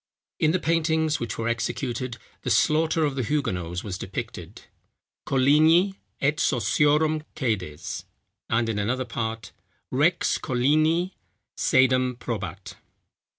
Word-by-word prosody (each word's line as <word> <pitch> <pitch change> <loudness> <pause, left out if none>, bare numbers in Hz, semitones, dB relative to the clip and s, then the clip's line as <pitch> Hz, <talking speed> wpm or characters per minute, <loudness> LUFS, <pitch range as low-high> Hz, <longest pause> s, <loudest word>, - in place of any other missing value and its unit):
In 155 - +3
the 175 - +2
paintings 160 -2 +1
which 115 -2 -4
were 115 - -2
executed, 120 +1 -2 0.2
the - - -3
slaughter 160 +1 +3
of 145 - -1
the 135 - -2
Huguenots 95 - -2
was 95 -3 -5
depicted, - - -7 0.6
"Colignii 155 +8 +4 0.3
et 145 +2 +1
Sociorum 150 +4 +2
cædes;" 95 - -3 0.4
and 115 0 +1
in 110 -2 -1
another 125 +5 -1
part, 115 -1 -4 0.4
_"Rex - - +2
Colignii 155 +8 +2 0.4
cædam 130 -1 +3
probat." 95 -6 -6
130 Hz, 110 wpm, -25 LUFS, 115-155 Hz, 0.6 s, Colignii